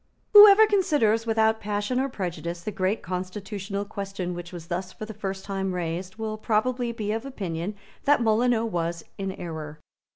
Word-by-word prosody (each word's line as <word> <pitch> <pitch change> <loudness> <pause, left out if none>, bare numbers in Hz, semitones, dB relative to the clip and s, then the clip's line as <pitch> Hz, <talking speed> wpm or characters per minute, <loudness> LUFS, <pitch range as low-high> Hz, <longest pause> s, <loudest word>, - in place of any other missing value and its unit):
Whoever 415 +1 +10
considers 295 - +2
without 220 0 +3
passion 210 +4 -1
or 270 +1 0
prejudice 175 -5 -4
the 215 - -3
great 195 +2 -1
constitutional 195 +2 -4
question 195 -3 -4
which 175 0 -7
was 175 -3 -8
thus 180 +2 -4
for 215 - -7
the 220 - -8
first 195 -2 -5
time 195 -2 -2
raised 180 +2 -3
will 220 -1 -4
probably 240 +3 0
be 215 -2 -3
of 225 +2 -2
opinion 195 -7 -4 0.3
that 290 +1 +5
Molyneux 230 0 +2
was 170 -5 -2 0.2
in 195 -1 -2
error. 155 -4 -7
205 Hz, 165 wpm, -26 LUFS, 180-225 Hz, 0.3 s, Whoever